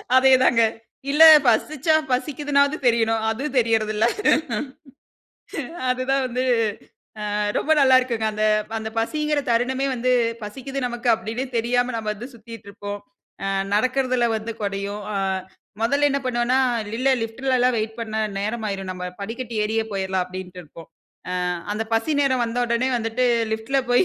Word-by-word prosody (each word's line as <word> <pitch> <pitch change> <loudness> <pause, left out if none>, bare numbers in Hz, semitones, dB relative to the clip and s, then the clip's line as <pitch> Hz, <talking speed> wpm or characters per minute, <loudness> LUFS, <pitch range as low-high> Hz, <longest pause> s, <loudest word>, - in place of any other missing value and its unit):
அதே 265 +1 +6
தாங்க. 230 -1 +4 0.5
இல்ல 310 +3 +6 0.2
பசிச்சா 295 +6 +2 0.2
பசிக்கிதுனாவது 285 +2 +1
தெரியனும். 225 -1 +2
அது 225 +5 -3
தெரியறதுல்ல. 220 -2 +2 1.8
அதுதான் 260 +2 0
வந்து 250 +1 -2 0.9
அ - - 0 0.2
ரொம்ப 315 - +1
நல்லாருக்குங்க. 255 -4 +3
அந்த 215 0 -1 0.3
அந்த 220 0 -5
பசிங்கிற 300 +4 0
தருணமே 255 +3 +1
வந்து, 255 +1 0 0.3
பசிக்குது 270 +6 -6
நமக்கு 240 0 -4
அப்டின்னே 225 +4 -4
தெரியாம 245 +2 +1
நம்ம 215 -1 -3
வந்து 240 +5 -8
சுத்திட்டு 230 -2 -12
இருப்போம். 205 0 -7 0.4
அ 195 - -1 0.3
நடக்றதில 255 +1 +1
வந்து 225 +1 -5
கொறையும். 200 +1 -3 0.8
மொதல்ல 280 +5 +3
என்ன 280 - +1
பண்ணுவோன்னா, 245 0 +1 0.3
இல்ல 210 - -7
இல்ல 270 +1 +2
லிஃப்ட்லலாம் 250 +2 +1
வெயிட் 220 +1 -3
பண்ணா 220 -1 -3 0.2
நேரமாயிரும். 200 -3 -3
நம்ம 180 0 -7 0.2
படிக்கட்டி 230 +3 -5
ஏறியே 220 +1 0
போயிரலாம் 190 -1 -1
அப்படின்ட்டு 180 0 -8
இருப்போம். 160 +1 -14 0.6
அ - - 0 0.3
அந்த 225 +1 -2
பசி 225 +7 0
நேரம் 260 -3 +2
வந்தவுடனே 240 +2 0
வந்துட்டு 230 +2 0 0.3
லிப்டில 230 +5 0
போயி, 245 +9 +5
235 Hz, 130 wpm, -22 LUFS, 220-260 Hz, 1.8 s, அதே